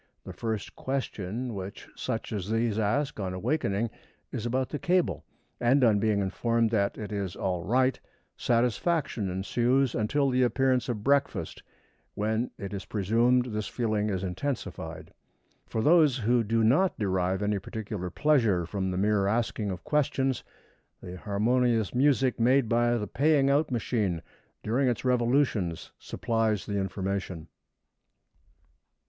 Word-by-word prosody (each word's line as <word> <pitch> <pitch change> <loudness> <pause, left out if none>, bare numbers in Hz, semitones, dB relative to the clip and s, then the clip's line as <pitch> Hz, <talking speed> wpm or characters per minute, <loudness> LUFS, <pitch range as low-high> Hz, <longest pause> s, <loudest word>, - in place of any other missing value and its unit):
The - - -8
first 110 -3 -4
question 125 -3 -3
which 95 0 -7
such - - -4
as 100 -2 -3
these 115 -1 0
ask 120 +5 0
on 95 -2 -3
awakening 105 - -1 0.4
is 115 - -3
about 130 +2 -1
the 150 - -4
cable, 180 0 +1 0.4
and 130 +3 +3
on 110 -4 +4
being 105 -1 +1
informed 115 +4 0
that 100 -3 +1
it 105 -1 -6
is 100 -4 -3
all 90 -2 -2
right, 130 +5 +2 0.4
satisfaction 120 - 0
ensues 120 +7 +1
until 135 +5 +1
the 125 0 +2
appearance 130 0 +2
of 105 -4 -3
breakfast, 140 +2 0 0.5
when 110 +3 0
it 100 0 -6
is 95 -1 -5
presumed 115 +6 +2
this 105 0 -2
feeling 110 -3 -1
is 95 -2 -2
intensified. 90 - -5 0.5
For 110 - -2
those 155 -4 +5
who 120 0 +2
do 115 +1 +1
not 150 +12 +3
derive 95 -1 0
any 105 -1 0
particular 100 -2 -5
pleasure 115 - +2
from 95 +2 -2
the 90 - -2
mere 100 0 +2
asking 110 -1 0
of 90 -2 -5
questions, 135 -3 0 0.6
the 90 0 -8
harmonious 110 +2 +1
music 130 -1 +2
made 125 +2 +4
by 120 +1 +2
the 105 - -2
paying 140 +4 +3
out 150 +2 +2
machine 105 -8 -1 0.4
during 130 +5 +1
its 120 0 -1
revolutions 120 - +1
supplies 110 -3 -1
the 100 -1 -2
information. 95 -3 -3
115 Hz, 140 wpm, -28 LUFS, 100-125 Hz, 0.6 s, those